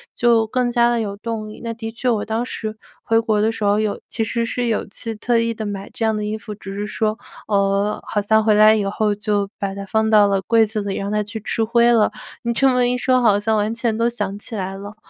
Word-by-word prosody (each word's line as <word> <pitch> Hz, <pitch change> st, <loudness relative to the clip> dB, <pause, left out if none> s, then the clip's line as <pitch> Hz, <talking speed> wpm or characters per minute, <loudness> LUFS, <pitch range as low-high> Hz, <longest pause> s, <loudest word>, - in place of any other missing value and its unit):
就 235 Hz, -2 st, +3 dB
更 250 Hz, +2 st, 0 dB
加 240 Hz, 0 st, +3 dB
地 240 Hz, -1 st, +1 dB
有 205 Hz, -3 st, -3 dB
动 215 Hz, +1 st, -5 dB
力， 215 Hz, -, -11 dB
那 230 Hz, -1 st, -3 dB
的 225 Hz, 0 st, -6 dB
确 245 Hz, +2 st, -1 dB
我 220 Hz, -3 st, 0 dB
当 225 Hz, +2 st, -1 dB
时 220 Hz, -3 st, -5 dB, 0.3 s
回 225 Hz, 0 st, +3 dB
国 220 Hz, -2 st, +1 dB
的 220 Hz, +1 st, +2 dB
时 225 Hz, -, -5 dB
候， 205 Hz, +1 st, +3 dB
有 215 Hz, -1 st, -2 dB
其 225 Hz, -, -1 dB
实 230 Hz, +2 st, -1 dB
是 245 Hz, +1 st, -2 dB
有 225 Hz, -, 0 dB
去 225 Hz, +3 st, -5 dB
特 235 Hz, +2 st, +1 dB
意 230 Hz, 0 st, 0 dB
地 220 Hz, -, -6 dB
买 200 Hz, -1 st, -5 dB
这 -, -, -4 dB
样 220 Hz, 0 st, +1 dB
的 210 Hz, -, -3 dB
衣 215 Hz, +1 st, -2 dB
服， 210 Hz, 0 st, -8 dB
只 195 Hz, -1 st, -8 dB
是 205 Hz, +1 st, -3 dB
说， 215 Hz, 0 st, -1 dB, 0.3 s
呃， 200 Hz, 0 st, +1 dB
好 210 Hz, -, 0 dB
像 220 Hz, +2 st, +3 dB
回 215 Hz, 0 st, +4 dB
来 215 Hz, +1 st, +7 dB
以 210 Hz, -, 0 dB
后 210 Hz, +1 st, 0 dB
就 205 Hz, -1 st, -1 dB
把 195 Hz, -1 st, -3 dB
它 200 Hz, 0 st, -6 dB
放 220 Hz, +2 st, +1 dB
到 210 Hz, -2 st, +6 dB
了 195 Hz, -1 st, +1 dB
柜 225 Hz, +3 st, +3 dB
子 215 Hz, 0 st, -3 dB
里， 200 Hz, -1 st, -3 dB
让 200 Hz, +1 st, -3 dB
它 210 Hz, 0 st, +1 dB
去 215 Hz, +2 st, -7 dB
吃 225 Hz, +1 st, -1 dB
灰 235 Hz, +2 st, +4 dB
了。 225 Hz, -3 st, +3 dB, 0.3 s
你 235 Hz, -, -1 dB
这 270 Hz, +4 st, +3 dB
么 250 Hz, -1 st, +2 dB
一 250 Hz, -, 0 dB
说 255 Hz, 0 st, +2 dB
好 205 Hz, -4 st, +4 dB
像 220 Hz, +1 st, 0 dB
完 210 Hz, +1 st, 0 dB
全 230 Hz, -1 st, -1 dB
都 230 Hz, +1 st, +2 dB
想 205 Hz, -4 st, -4 dB
起 225 Hz, -, -8 dB
来 190 Hz, -1 st, -4 dB
了， 205 Hz, +2 st, -9 dB
215 Hz, 285 characters per minute, -20 LUFS, 205-230 Hz, 0.3 s, 来